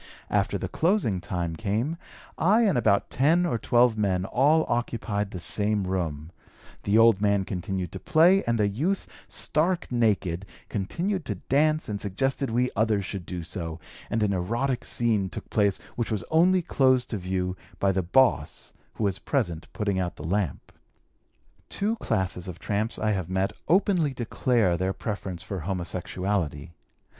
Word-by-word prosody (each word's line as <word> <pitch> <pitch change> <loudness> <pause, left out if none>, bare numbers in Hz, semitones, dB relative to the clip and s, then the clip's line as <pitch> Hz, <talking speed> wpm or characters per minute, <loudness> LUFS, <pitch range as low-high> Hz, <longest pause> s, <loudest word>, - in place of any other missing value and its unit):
After - - +1
the - - -4
closing 165 - +1
time 85 -1 -3
came, 110 - -1 0.4
I 205 +8 +4
and 200 -8 +3
about 105 -4 +2
ten 160 +7 +3
or 140 -10 0
twelve 120 -2 +3
men 95 -3 +1
all 145 +9 +3
occupied 115 -4 -1
the 90 - -6
same 105 +3 0
room; 85 -4 -3 0.5
the 100 +2 +2
old 115 -3 +6
man 100 -2 +2
continued 95 -2 -3
to - - -6
play, 180 +3 +4
and 115 0 +1
the 105 -2 +2
youth, 155 - -1 0.2
stark 160 - +1
naked, 100 -6 +1 0.2
continued 175 - -2
to 105 - -2
dance 155 - +1
and 105 -1 -4
suggested 135 +7 -1
we 125 +2 +1
others 105 -2 +1
should 95 -2 -6
do 90 -2 -4
so, 80 -2 -5 0.3
and 110 -1 0
an 100 -1 +1
erotic 120 +8 -1
scene 110 -5 +1
took - - -8
place 100 -3 +2 0.2
which 120 - -2
was 105 - -1
only 180 +3 +4
closed 130 -5 +2
to 110 - -1
view 90 0 -2 0.2
by 100 - +2
the 95 0 0
'boss' 125 +9 +1 0.2
who - - -4
was 100 -2 0
present 90 - -1
putting 100 -3 -1
out 90 -3 -2
the 75 - -9
lamp. 90 -3 -2 1.0
"Two 215 +3 0
classes 95 - -1
of 90 -2 -6
tramps 105 +5 -1
I 110 0 0
have 95 -4 -2
met 95 +1 0
openly 180 -6 +2
declare 115 -6 +1
their 95 +2 -1
preference 95 -5 -5
for 95 -1 -5
homosexuality. 90 -3 -3
105 Hz, 160 wpm, -26 LUFS, 95-130 Hz, 1.0 s, old